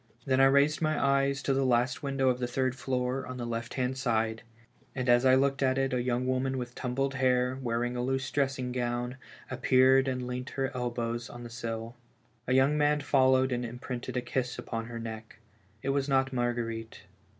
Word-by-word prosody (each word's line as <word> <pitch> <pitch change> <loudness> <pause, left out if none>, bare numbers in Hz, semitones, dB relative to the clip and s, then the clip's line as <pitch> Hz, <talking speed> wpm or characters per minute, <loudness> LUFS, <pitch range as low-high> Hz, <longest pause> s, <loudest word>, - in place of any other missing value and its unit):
Then 130 -1 +2
I - - +8
raised 140 +3 +4
my 155 -1 +1
eyes 140 0 +2
to 135 - +1
the 135 0 +1
last 125 -1 +1
window'' 135 -2 +1
of 125 -1 0
the 125 - -1
third 130 +1 0
floor 130 0 -2
on 130 0 -6
tlie 120 -1 -4
left 115 -1 -4
hand 130 0 -1
side, 115 -2 0 0.5
and 130 -1 -2
as 120 +1 +5
I 130 0 +6
looked 135 +1 +1
at 130 -1 +2
it 135 -1 0
a 125 - +1
young 125 0 0
woman 130 +1 0
with 125 -1 -5
tumbled 135 +3 -2
hair, 130 0 +1
wearing 120 0 -1
a 120 - -1
loose 135 +2 -1
dressing 135 -3 -1
gowm, 120 0 -2 0.3
appeared 130 +1 +4
and 125 -1 -2
leant 125 +1 -4
her 135 0 -1
elbows 120 -1 -3
on 120 0 -9
the 120 - -9
sill. 115 0 -5 0.5
A 130 - +1
young 135 +3 +4
man 150 0 +3
followed 130 -2 +3
and 125 0 -1
imprinted 125 +1 -5
a - - +1
kiss 125 +1 -2
upon 115 0 -4
her 120 0 -6
neck. 110 -1 -7 0.5
It 135 - -1
was 140 0 0
not 135 0 +2
Marguerite. 120 -2 -2
130 Hz, 200 wpm, -29 LUFS, 120-135 Hz, 0.5 s, I